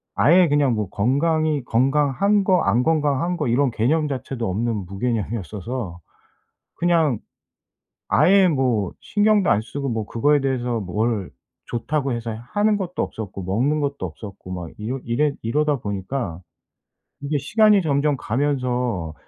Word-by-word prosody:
아예 175 +3 +5
그냥 145 -3 +3
뭐 105 -4 -2
건강이 150 - +1
건강한 145 - +2
거, 185 -1 +3
안 120 - +2
건강한 155 +3 +1
거 150 - -1
이런 130 +4 +2
개념 145 +8 +1
자체도 130 -4 -4
없는 105 0 -2
무개념이었어서 105 - -4 0.8
그냥 165 -8 +2 0.9
아예 195 0 +5
뭐 125 - 0
신경도 205 -2 +2
안 105 - +3
쓰고 140 +4 -4
뭐 110 -2 -2
그거에 145 +7 +2
대해서 125 -3 -1
뭘 105 +1 -2 0.4
좋다고 135 +3 -2
해서 115 0 -4 0.2
하는 210 0 +2
것도 180 -2 -3
없었고 100 -3 -6
먹는 125 +12 0
것도 140 -1 -1
없었고 95 +3 -10
막 90 -3 -6
이러 115 +5 -3
이래 140 +5 +1
이러다 150 +6 +1
보니까 100 -2 -4 0.8
이게 145 +1 -1
시간이 210 +6 +4
점점 145 -2 +1
가면서 125 - -1
130 Hz, 285 characters per minute, -22 LUFS, 110-150 Hz, 0.9 s, 아예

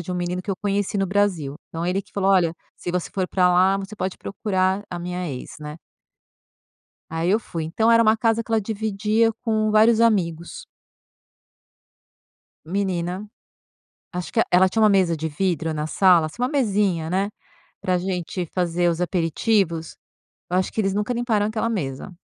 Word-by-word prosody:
de 175 +2 -5
menino 180 +1 -2
que 190 - -5
eu 190 - -1
conheci 205 0 -1
no 195 -1 +1
Brasil, 185 -8 0
então 165 +1 -4
ele 180 +2 0
que - - -19
falou: 195 -1 +1
"Olha, 175 -4 +3 0.2
se 175 - -5
você 180 -1 -2
for 185 -2 -1
pra 180 -1 +3
lá, 185 +2 +4
você 195 +2 -6
pode 185 -2 -3
procurar 190 -1 -1
a 175 - -5
minha 180 0 -4
ex, 130 -3 -7
né". 150 0 -7 1.3
Aí 165 +3 0
eu 215 - +4
fui. 165 -7 -5
Então 220 +8 +1
era 230 0 +6
uma 220 0 +4
casa 225 0 +1
que 230 - -15
ela 225 -1 +3
dividia 220 +1 0
com 215 -2 +1
vários 220 +1 +5
amigos. 175 -7 0 2.0
Menina, 185 +1 -2 0.8
acho 180 0 -5
que - - -2
eh 225 - +5
ela 185 +1 +6
tinha 220 +4 -1
uma 215 - +7
mesa 185 -5 +3
de 160 +1 -3
vidro 160 -1 -1
na 150 0 -3
sala, 180 -2 +4
assim, 155 +10 -10
uma 250 - +2
mesinha, 200 - +1
né, 195 +2 +1 0.5
pra 185 -1 +1
gente 180 -1 -3
fazer 175 -1 +1
os 170 0 -1
aperitivos. 170 -1 0 0.5
Acho 185 +1 0
que 220 - 0
eles 195 -1 0
nunca 210 +4 -1
limparam 230 -4 +1
aquela 215 +1 -1
mesa. 145 -8 -4
190 Hz, 175 wpm, -23 LUFS, 175-210 Hz, 2.0 s, uma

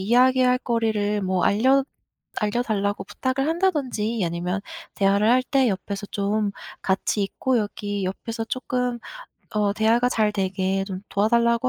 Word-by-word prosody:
이야기할 250 +4 +4
거리를 215 -4 0
뭐 185 -1 +1
알려 260 +6 +4 0.6
알려달라고 205 -2 -1
부탁을 260 +6 -2
한다든지 280 - 0
아니면 175 +3 -2 0.3
대화를 200 +2 +3
할 255 +1 +4
때 265 -1 +2
옆에서 200 0 -3
좀 205 +1 -1 0.3
같이 195 +2 0
있고 245 +5 0
여기 205 -1 -3
옆에서 225 +5 -4
쪼끔 250 0 -2 0.5
어 210 -1 +1
대화가 230 +3 +3
잘 215 -3 +1
되게 190 -1 0
좀 190 -1 -6
도와달라고 235 +4 +2
215 Hz, 300 characters per minute, -24 LUFS, 200-250 Hz, 0.6 s, 이야기할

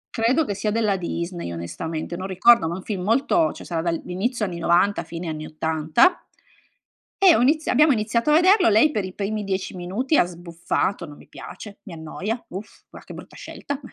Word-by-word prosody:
credo 250 +7 +2
che 205 - -3
sia 210 +1 -2
della 215 -3 +1
Disney 170 - -4
onestamente, 155 - -5
non 185 +2 -5
ricordo, 190 -1 +4
ma 170 - -3
è - - -5
un 190 - -9
film 195 -4 -4
molto 280 - +2
c'è - - -11
sarà 165 -2 -2
dal 170 -1 -2
inizio 210 +5 -2
anni 175 -2 -5
'90, 175 +4 +2
fine 170 0 -7
anni 155 -1 -5
'80, 160 - +1 0.9
e 375 -4 +6
ho - - +2
iniz 305 +5 +2
abbiamo 300 +3 +4
iniziato 230 +3 0
a - - +5
vederlo, 370 - +5
lei 220 +9 +4
per 210 -7 -2
i 185 0 -7
primi 210 +1 -3
10 190 -1 -3
minuti 200 - -2
ha - - +5
sbuffato: 170 +1 -3
"Non 145 -2 -12
mi - - -17
piace, 205 -2 -11
mi 185 - -11
annoia, 185 +9 -5
uff, 195 +4 -10
va - - -11
che - - -12
brutta - - -12
scelta", 285 -1 -6
195 Hz, 205 wpm, -23 LUFS, 170-235 Hz, 0.9 s, e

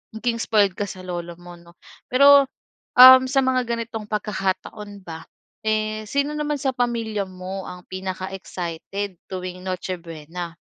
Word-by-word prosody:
naging 230 +1 -1
spoiled 205 -4 +3
ka 205 - -1
sa 185 - -8
lolo 175 -1 -5
mo 175 0 -11
'no? 170 0 -18 0.4
Pero, 280 +2 +7 0.5
um, 260 +1 +11
sa 270 +1 +2
mga 255 -1 +2
ganitong 230 -2 -4
pagkakataon 205 0 -3
ba, 160 -1 -8 0.4
eh 215 0 -1
sino 280 +4 0
naman 295 -1 -1
sa 270 - +1
pamilya 230 -4 -1
mo 185 +1 -7
ang 180 0 -9
pinaka-excited 185 0 -5
tuwing 185 -1 -6
Noche 185 0 -3
Buena? 165 +1 -8
200 Hz, 140 wpm, -23 LUFS, 180-230 Hz, 0.5 s, um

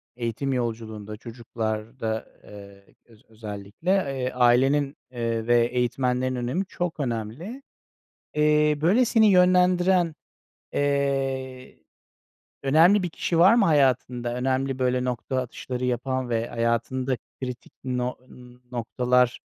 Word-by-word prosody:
eğitim 120 +3 -2
yolculuğunda, 110 -3 -4
çocuklarda, 110 0 -4 0.2
eee, 100 -1 -14
öz 115 -2 -21
özellikle, 105 - -7
eee, 135 -9 0
ailenin, 135 +4 +3
eee, 115 -2 -2
ve 120 -1 +4
eğitmenlerin 125 +1 0
önemi 125 +10 -2
çok 175 -3 -4
önemli. 130 - -4 0.7
Eee, 150 0 +3
böyle, 195 +11 +4
seni 225 -2 +4
yönlendiren, 180 -2 +4 0.6
eee, 135 -2 -1 0.8
önemli 165 +8 +5
bir 180 - -2
kişi 165 +1 -1
var 185 +5 +7
mı 230 -4 +4
hayatında, 130 -5 +1
önemli, 130 +1 -1
böyle, 125 0 +1
nokta 125 +1 -3
atışları 125 0 -5
yapan 125 +1 -2
ve 115 0 -1
hayatında 120 +3 -1 0.2
kritik 125 -1 -6
no 125 -1 -2 0.5
noktalar, 125 +1 +1
125 Hz, 110 wpm, -25 LUFS, 120-145 Hz, 0.8 s, var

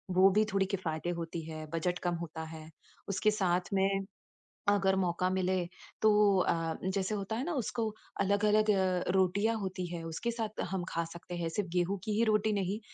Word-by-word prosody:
वो 190 +1 +7
भी 210 +3 +4
थोड़ी 195 -1 +3
किफ़ायती 175 -4 -2
होती 170 0 -3
है, 155 -1 -6
बजट 175 +2 0
कम 175 -1 -1
होता 165 -1 -5
है। 160 -1 -9 0.4
उसके 210 +2 +2
साथ 180 -4 +1
में, 195 0 +2 0.7
अगर 195 -1 +3
मौका 180 -1 +1
मिले 185 0 +1 0.4
तो 220 - +6 0.3
अ, 165 -2 +1
जैसे 190 +2 0
होता 200 +2 -3
है 240 - -1
ना? 350 - -1
उसको 235 -4 -1 0.3
अलग-अलग 210 +2 +3
अ, 185 -2 +1
रोटियाँ 195 +4 +2
होती 185 -2 -3
हैं, 170 -1 -4
उसके 165 +9 -2
साथ 225 -2 -3
हम 190 -2 -1
खा 170 0 -1
सकते 175 +1 -8
हैं। 170 -1 -1
सिर्फ़ 185 +2 -2
गेहूँ 185 +3 +1
की 215 - -1
ही - - +5
रोटी 215 0 +2
नहीं 200 +1 -1
190 Hz, 185 wpm, -32 LUFS, 175-205 Hz, 0.7 s, वो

